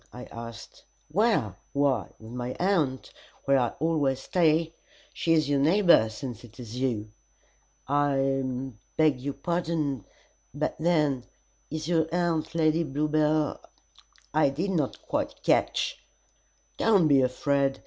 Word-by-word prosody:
I 125 - -9
asked 115 -1 -9 0.3
"Where? 160 - +1 0.2
Why, 140 -6 +1
with 110 +1 -11
my 125 +1 -4
aunt, 165 -9 0 0.3
where 140 -1 +4
I 125 - +2
always 145 -4 +1
stay. 165 -1 +2 0.4
She 165 - +1
is 155 -3 +3
your 145 -1 +2
neighbor, 170 - +5
since 120 +1 -7
it 120 +1 -15
is 120 0 -8
you." 110 -5 -1 0.8
"I 135 -2 0 0.3
beg 155 -5 +3
your 140 +1 -4
pardon 160 - -2 0.5
but 150 +1 -1
then 150 -6 +1 0.4
is 155 0 -4
your 165 -2 +2
aunt 170 -2 0
Lady 160 0 +3
Bluebell? 150 +1 +1 0.7
I 155 -2 +4
did 170 +8 -2
not 155 -7 -1
quite - - -2
catch - - +1 0.4
" - - -39
"Don't 200 -7 +4
be 140 -2 +5
afraid. 135 +1 +1
145 Hz, 130 wpm, -27 LUFS, 130-160 Hz, 0.8 s, neighbor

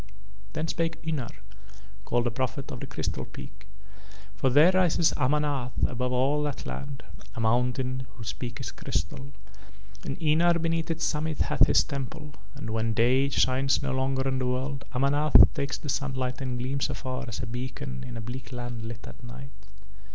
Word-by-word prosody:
Then 155 +1 -1
spake 165 0 -1
Ynar, 150 -7 -1 0.8
called 120 0 +2
the 120 - +1
prophet 130 +3 -3
of 125 - -5
the - - -6
Crystal - - -3
Peak; 65 +8 -11 0.7
for 95 +7 +2
there 150 +8 +7
rises 180 -3 +3
Amanath 140 -2 +1
above 125 +1 -1
all 135 +4 +2
that 145 -2 -3
land, 140 -1 -6 0.3
a - - -5
mountain 125 +2 +1
whose 110 -1 -5
peak 120 -2 -6
is - - -4
crystal, 135 +1 -3 0.7
and 135 - -4
Ynar 170 +2 +4
beneath 165 0 0
its 165 0 0
summit 155 0 -1
hath - - +4
his - - +5
Temple, 145 +1 -5 0.2
and 110 - -5
when 110 0 0
day 130 +5 +4
shines 135 +1 +2
no 140 - 0
longer 130 0 0
on 130 -1 0
the 130 - 0
world 130 +2 -2
Amanath 145 +4 +6
takes 140 -3 -2
the - - -8
sunlight 130 -2 -1
and 130 -2 -2
gleams 130 +3 -1
afar 130 +1 -4
as 115 - -5
a - - 0
beacon 130 +2 -5
in 125 -2 -6
a - - -4
bleak 120 +4 -7
land 120 -2 -5
lit 115 0 -7
at - - -11
night. 125 +3 -9
130 Hz, 175 wpm, -28 LUFS, 125-145 Hz, 0.8 s, there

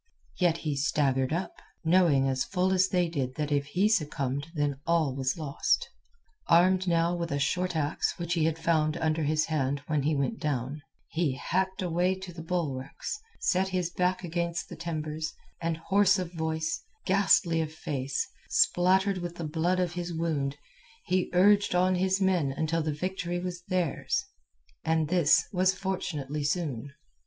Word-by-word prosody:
Yet 175 -3 +3
he 150 -2 0
staggered 135 -1 +1
up, 170 +4 -3 0.2
knowing 160 -6 +4
as 130 -1 +1
full 185 0 0
as 185 0 +4
did 175 -3 0
they 135 -5 0
that 150 -1 -2
if 140 -1 +1
he 185 +7 +2
succumbed 145 - 0
then 145 -2 0
all 165 -5 +2
was 135 +2 -1
lost. 150 -4 0 0.6
Armed 185 +2 +4
now 170 0 +2
with 170 -1 -3
a 140 - 0
short 180 +5 0
axe 150 0 0
which 170 -1 -2
he 165 -3 +2
had 160 0 0
found 160 -1 +1
under 160 -1 0
his 155 +1 +1
hand 140 -3 -1
when 150 -2 0
he 150 +2 +1
went 140 +11 -1
down, 140 0 -2 0.3
he 160 -4 0
hacked 190 +7 -1
a 180 - -1
way 180 +3 +2
to 190 -1 -9
the 165 - -8
bulwarks, 160 - -3 0.2
set 190 0 +2
his 180 -2 -1
back 180 +1 0
against 170 0 -2
the - - -7
timbers, 155 -1 -4 0.3
and 165 -1 -1
hoarse 190 +3 +3
of 180 -2 -4
voice, 160 - -2 0.2
ghastly 185 -3 +3
of 155 -1 -3
face, 140 -4 -3 0.2
spattered 190 +2 +3
with 175 -1 -5
the 170 - -5
blood 165 +4 0
of 180 -2 0
his 175 0 -4
wound 155 -4 -1 0.5
he 185 0 +1
urged 200 +1 +4
on 185 +1 +3
his 190 +1 +1
men 180 -8 +2
until 160 +4 -1
the 155 0 -1
victory 175 +2 -3
was 180 -1 -5
theirs—and 180 - -2
this 175 -4 +4
was 185 0 +3
fortunately 155 -7 -3
soon. 145 -4 -2
165 Hz, 165 wpm, -28 LUFS, 150-180 Hz, 0.6 s, knowing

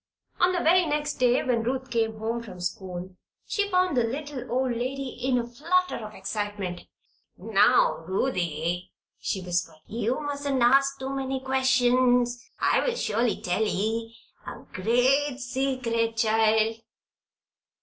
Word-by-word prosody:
On 355 +1 +4
the 355 -1 0
very 355 +1 +4
next 295 -1 -2
day, 250 0 +3
when 240 -3 +1
Ruth 260 +2 -3
came 225 -2 0
home 225 +2 -2
from 205 -6 -10
school, 180 0 -5 0.3
she 410 -1 -1
found 365 -4 +2
the 245 - +3
little 280 +3 -4
old 255 +1 +1
lady 255 +3 -3
in 250 +1 -1
a 240 - -1
flutter 340 +10 0
of 215 -1 -8
excitement. 200 -2 -4 0.5
"Now, - - +3
Ruthie," 180 - -1 0.3
she 190 - -3
whispered, 175 -2 -2
"you 230 +4 -2
mustn't 285 -3 -1
ask 275 +3 +4
too 265 0 -5
many 270 0 -2
questions, 250 -2 +2 0.2
and - - +3
I'll - - 0
surely 230 - 0
tell 180 +4 0
ye 225 +2 -2 0.3
a - - -8
gre't 255 +7 +2
secret, 245 -3 -1
child." 220 0 +3
245 Hz, 140 wpm, -26 LUFS, 220-270 Hz, 0.5 s, On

